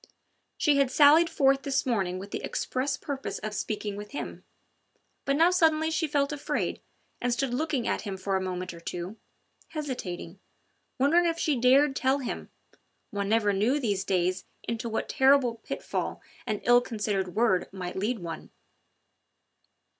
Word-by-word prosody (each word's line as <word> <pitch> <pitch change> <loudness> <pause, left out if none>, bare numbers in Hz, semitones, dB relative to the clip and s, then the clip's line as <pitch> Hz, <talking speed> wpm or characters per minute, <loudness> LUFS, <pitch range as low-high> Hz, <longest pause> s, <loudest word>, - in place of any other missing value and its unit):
She 295 -3 +3
had 275 -2 +3
sallied 305 +5 +6
forth 275 -1 +3
this 275 0 0
morning 195 -8 0
with 195 +2 -8
the - - -3
express 260 +1 -2
purpose 275 -1 -4
of 215 0 -5
speaking 210 0 -3
with 205 +3 -8
him; - - -6 0.8
but 275 - +2
now 335 +4 +5
suddenly 320 -3 +3
she 320 0 0
felt 285 -1 +1
afraid, 290 -1 -2 0.4
and 245 - 0
stood 250 +1 0
looking 285 -3 -1
at - - 0
him 195 -3 -5
for 195 +1 -1
a 190 - +1
moment 185 -1 -4
or 170 - -10
two, 175 +5 -6 0.5
hesitating, 200 - -5 0.6
wondering 330 +6 +4
if 330 0 0
she 310 -3 +1
dared 270 +3 +4
tell 265 +1 +2
him 260 -4 -5 0.6
one 200 -1 -2
never 215 -2 +3
knew 225 +9 +2
these 205 -7 0
days 185 0 0 0.2
into 230 0 -3
what 225 - -2
terrible 265 -3 +4
pitfall 225 - -4 0.3
an 215 -3 -2
ill 245 0 +6
considered 200 -6 -2
word 220 -6 +2
might 180 -2 -6
lead 215 +6 -1
one. 170 -4 -7
240 Hz, 160 wpm, -28 LUFS, 195-280 Hz, 0.8 s, sallied